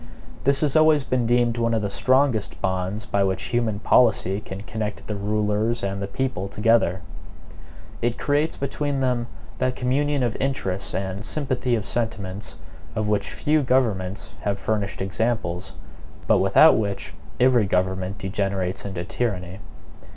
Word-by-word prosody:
This 140 +1 +5
has 150 -2 +2
always 155 -2 +5
been 125 -3 0
deemed 120 0 +2
one 115 0 +1
of 110 - 0
the - - 0
strongest 130 -4 +1
bonds 95 +3 -2
by 100 - +1
which 95 -1 -1
human 115 -3 +1
policy 105 -5 +3
can 95 -2 -7
connect 110 -1 -5
the 105 - -4
rulers 105 +3 0
and 100 0 -2
the 100 - -2
people 100 -2 -2
together. 105 -3 +2 1.0
It 120 0 0
creates 145 +2 +1
between 140 0 -2
them 125 -2 0 0.3
that 130 0 0
communion 140 +2 +1
of 120 -3 -1
interests 100 -8 -1
and 95 +1 -3
sympathy 130 -1 0
of 110 -3 -3
sentiments, 100 -9 -3 0.4
of 110 -1 -1
which 105 -1 0
few 155 0 +1
governments 110 -8 0
have 100 -1 -1
furnished 100 -2 -2
examples; 95 -3 -2 0.5
but - - +4
without 95 +12 +6
which 100 -2 -3 0.3
every 125 -4 +4
government 95 +1 -1
degenerates 95 -2 -2
into 95 -3 -4
tyranny. 95 -1 -3
110 Hz, 145 wpm, -24 LUFS, 95-125 Hz, 1.0 s, without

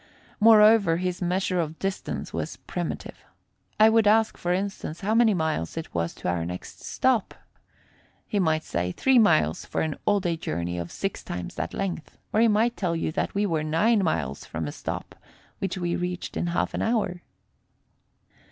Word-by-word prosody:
Moreover 215 -5 +6
his 180 0 -2
measure 180 +1 0
of 160 -1 -2
distance 195 0 -4
was - - -4
primitive. - - -5 0.6
I 215 - +8
would 220 -1 +4
ask, 220 +1 +4
for 175 - -2
instance, 190 -3 -3
how 205 +3 0
many 225 -2 +4
miles 160 - -2
it 165 - -6
was 85 0 -2
to - - -6
our 90 -1 0
next 90 +2 -7
stop. - - 0 0.9
He 205 - -1
might 160 -3 +1
say 90 - -2
three 265 -2 +4
miles 80 - +3
for - - -3
an 155 -2 -1
all 205 -1 +4
day 175 -3 -1
journey 85 - -3
of 85 0 -5
six 195 -1 -4
times 90 0 -5
that 85 - -4
length, 180 -5 -4 0.2
or 215 - +3
he 230 - +6
might 225 +2 +2
tell 175 -4 -1
you 165 - -1
that - - -2
we 205 +1 +2
were 165 -5 0
nine 200 +8 +2
miles 70 - -1
from 80 -1 -5
a 75 - -4
spot - - -6 0.5
which 190 -1 -2
we 175 -1 -1
reached 180 0 -4
in - - -1
half 170 - -1
an - - -2
hour. 215 -6 0
180 Hz, 180 wpm, -26 LUFS, 155-205 Hz, 0.9 s, I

